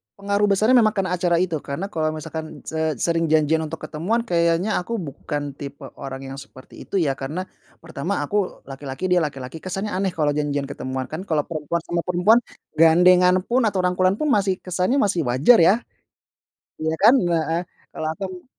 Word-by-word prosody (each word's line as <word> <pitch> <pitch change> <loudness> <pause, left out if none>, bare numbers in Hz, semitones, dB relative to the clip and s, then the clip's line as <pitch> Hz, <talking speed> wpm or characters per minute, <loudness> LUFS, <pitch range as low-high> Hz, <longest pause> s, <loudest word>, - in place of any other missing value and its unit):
pengaruh 200 +1 0
besarnya 215 +6 +4
memang 215 -2 +3
karena 190 -3 -1
acara 175 -2 +2
itu, 170 -2 0
karena 170 +9 -5
kalau 155 -1 -1
misalkan 155 +1 -7
se 160 -1 -2
sering 165 +5 0
janjian 155 0 +3
untuk 160 +1 -8
ketemuan 175 +10 -1
kayaknya 170 0 +1
aku 205 +6 -4
bukan 145 - -4
tipe 140 0 -8 0.2
orang 135 -1 -6
yang 135 - -7
seperti 130 -1 -14
itu, - - -6
ya, 165 -7 +2
karena 155 +7 -4 0.4
pertama, 165 +2 -3
aku 200 +5 -2
laki-laki, 135 +6 -5
dia 180 - +5
laki 145 -5 -3
laki, 125 +6 -8
kesannya 195 +4 -4
aneh 190 0 -1
kalau 150 -2 +1
janjian 145 -1 -1
ketemuan, 130 -1 -4
kan, 175 +6 -6
kalau 150 -3 +1
perempuan 160 +1 -3
sama 170 0 -2
perempuan 180 +6 +4 0.4
gandengan 180 +2 +6
pun, 240 +1 +1
atau 190 -3 0
rangkulan 185 +1 +2
pun 300 +6 -1
masih 200 -2 +2
kesannya 185 +6 0
masih 180 -8 +1
wajar, 135 - +5
ya. 170 +3 +6 1.0
Iya, 160 0 -1
kan, 225 +6 +7 0.2
heeh. 165 0 0 0.3
Kalau 155 - -5
aku 185 -1 -7
170 Hz, 180 wpm, -22 LUFS, 150-190 Hz, 1.0 s, kan